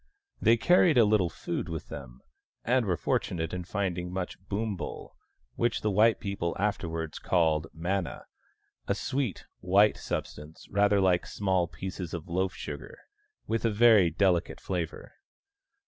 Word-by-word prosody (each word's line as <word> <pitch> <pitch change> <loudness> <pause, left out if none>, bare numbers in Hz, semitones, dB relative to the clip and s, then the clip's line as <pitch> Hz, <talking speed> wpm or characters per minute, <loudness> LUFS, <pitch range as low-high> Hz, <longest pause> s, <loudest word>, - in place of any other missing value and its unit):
They 115 +1 +5
carried 170 +3 +4
a 115 - +7
little 105 -4 +3
food 85 - -4
with 80 -1 -6
them, 65 -3 -9 0.4
and 125 -1 +2
were 90 -3 +1
fortunate 80 +2 -1
in 90 -1 -4
finding 90 -2 -2
much 90 0 -4
boombul, 105 -2 -4 0.4
which 120 -1 0
the 105 - 0
white 110 +3 +4
people 100 -5 -3
afterwards 85 -6 -2
called 80 -3 +1
manna 90 +2 -3 0.3
— - - -45
a - - +1
sweet 130 -8 -2
white 100 +4 +4
substance 75 +2 -6
rather 100 0 +3
like 90 -2 +2
small 95 -3 0
pieces 95 -1 -6
of 85 -1 -7
loaf 95 +2 -1
sugar, - - -7 0.5
with 115 - -1
a 115 - +3
very 110 -4 +6
delicate 90 +1 +1
flavour. 85 -4 -4
95 Hz, 145 wpm, -29 LUFS, 85-105 Hz, 0.5 s, a